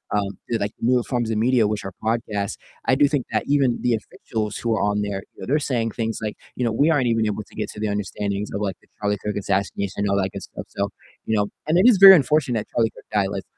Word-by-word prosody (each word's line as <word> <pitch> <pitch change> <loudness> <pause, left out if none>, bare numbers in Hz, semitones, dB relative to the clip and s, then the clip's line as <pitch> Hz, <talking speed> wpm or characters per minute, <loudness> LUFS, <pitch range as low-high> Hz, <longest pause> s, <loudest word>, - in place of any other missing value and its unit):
um, 100 -1 -1
to 115 - +1
like 100 0 -2
newer 125 +1 +3
forms 120 -3 -2
of 110 - 0
media, 115 -1 +3
which 105 -1 -3
are 95 - -6
podcasts, 110 -3 -1 0.3
I 130 - +4
do 145 +1 +5
think 140 -3 -1
that - - +1
even 140 -4 +2
the 120 - +2
officials 110 0 -5
who 115 -1 -1
are - - -1
on 105 0 +1
there, 100 -1 -3
you - - -14
know, - - -5
they're 150 +5 +2
saying 120 -6 -1
things 115 -1 -3
like, 105 - -3 0.2
you 125 - -1
know, 115 - +1
"We 145 +8 +3
aren't 145 -6 +3
even 115 -2 +2
able 105 0 -2
to - - -21
get 105 -1 -3
to - - -10
the 110 - -1
understandings 100 0 -3
of, 100 - -3
like, 95 -3 -2
the - - -27
Charlie 105 0 0
Kirk 105 0 -2
assassination 100 0 -1
and 100 0 0
all 100 - +2
that 95 -1 0
good 100 - -6
stuff," - - -8
so, 100 0 -2 0.4
you 110 - +1
know. 100 0 +1 0.2
And 165 +3 +3
it 200 +7 +6
is 225 -6 +6
very 195 0 +11
unfortunate 145 -5 +2
that - - -11
Charlie 115 -1 +3
Kirk - - -16
died. 100 -2 +2
Like, 100 -1 -4
110 Hz, 275 wpm, -23 LUFS, 100-125 Hz, 0.4 s, very